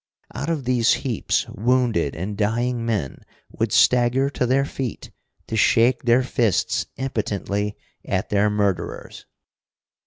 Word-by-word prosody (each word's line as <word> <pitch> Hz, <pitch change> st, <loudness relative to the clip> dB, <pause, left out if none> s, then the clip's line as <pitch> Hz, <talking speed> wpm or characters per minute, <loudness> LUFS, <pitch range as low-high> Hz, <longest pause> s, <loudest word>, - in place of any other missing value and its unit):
Out 145 Hz, -, -4 dB
of 160 Hz, -4 st, -1 dB
these 125 Hz, -2 st, +3 dB
heaps 120 Hz, -5 st, 0 dB
wounded 115 Hz, -, +1 dB
and 95 Hz, +5 st, -4 dB
dying 115 Hz, +3 st, -1 dB
men 105 Hz, -, -2 dB, 0.3 s
would -, -, -2 dB
stagger 125 Hz, +3 st, +3 dB
to 125 Hz, -, -1 dB
their 135 Hz, +2 st, +2 dB
feet 130 Hz, -5 st, -5 dB, 0.3 s
to 110 Hz, -, -5 dB
shake 115 Hz, +3 st, +3 dB
their 120 Hz, +2 st, +4 dB
fists 115 Hz, -6 st, 0 dB
impotently 105 Hz, -5 st, -2 dB, 0.3 s
at 95 Hz, -, -2 dB
their 105 Hz, +1 st, +2 dB
murderers. 100 Hz, -3 st, -3 dB
115 Hz, 125 wpm, -22 LUFS, 105-125 Hz, 0.3 s, their